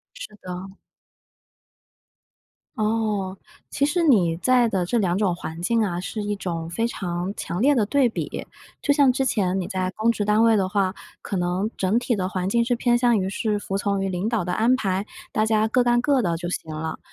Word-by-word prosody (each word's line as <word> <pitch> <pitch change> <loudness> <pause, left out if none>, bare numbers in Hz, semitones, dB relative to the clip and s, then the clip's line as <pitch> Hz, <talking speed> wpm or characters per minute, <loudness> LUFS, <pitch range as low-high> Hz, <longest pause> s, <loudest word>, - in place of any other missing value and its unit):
是 215 - -9
的。 185 +1 -7 2.0
哦， 210 -3 -1 0.3
其 280 - +1
实 340 +3 +1
你 185 - +4
在 245 +5 +3
的 190 -5 0
这 240 +6 0
两 185 -3 +1
种 195 -4 +1
环 165 -1 -7
境 230 +5 +1
啊， 180 -4 -1
是 215 +3 -4
一 205 0 -2
种 170 -4 -4
非 225 +7 -1
常 180 -3 -3
强 175 - -3
烈 285 +3 +5
的 225 -6 +2
对 265 +1 +3
比， - - -5 0.4
就 285 - +3
像 275 -3 +4
之 270 - 0
前 195 -6 0
你 - - -4
在 185 -1 -2
公 225 +2 +2
职 210 -2 -2
单 210 +2 +3
位 225 -2 +5
的 190 -1 +1
话， 195 -1 0 0.3
可 195 - -3
能 180 +4 0
整 195 +4 +1
体 240 -3 -1
的 185 -1 -1
环 185 -1 -2
境 235 +2 +2
是 245 0 +1
偏 240 0 +2
向 240 -2 +3
于 190 0 -1
是 210 +1 -1
服 195 -1 -3
从 200 -1 -1
于 195 - -1
领 185 +3 -2
导 230 -5 0
的 180 - -3
安 240 +3 +3
排， 195 -4 -1 0.3
大 215 - +1
家 220 0 +2
各 245 +1 +2
干 240 0 +3
各 275 -2 +2
的 170 -4 0
就 175 +1 -4
行 160 -3 -4
了。 160 +1 -4
205 Hz, 230 characters per minute, -23 LUFS, 185-235 Hz, 2.0 s, 烈